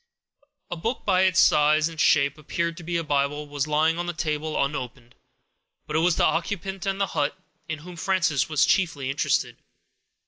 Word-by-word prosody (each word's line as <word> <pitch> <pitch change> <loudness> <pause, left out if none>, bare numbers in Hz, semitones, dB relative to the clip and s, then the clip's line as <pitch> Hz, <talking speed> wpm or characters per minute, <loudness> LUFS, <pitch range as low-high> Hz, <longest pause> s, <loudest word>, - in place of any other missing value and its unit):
A - - -2
book, 225 +10 -3
that - - -33
by 185 -2 +3
its 185 -1 +3
size 150 +1 +4
and 165 -2 -4
shape, 140 0 +3
appeared 170 +2 -2
to 175 - -9
be 170 +1 -2
a 165 - -2
Bible, 145 0 -1
was 145 0 -3
lying 155 +2 +2
on 175 - -3
the 175 - -2
table, 155 -1 -2
unopened. 125 -3 -4 0.7
But 150 - -5
it - - +4
was 170 0 +2
the - - +3
occupant 190 +1 -2
of 195 0 0
the 195 - +1
hut 145 - -2 0.3
in 160 - -3
whom 175 +3 -11
Frances 185 -6 +1
was 155 -3 +3
chiefly 145 -8 0
interested. 140 - 0
160 Hz, 195 wpm, -25 LUFS, 145-175 Hz, 0.7 s, size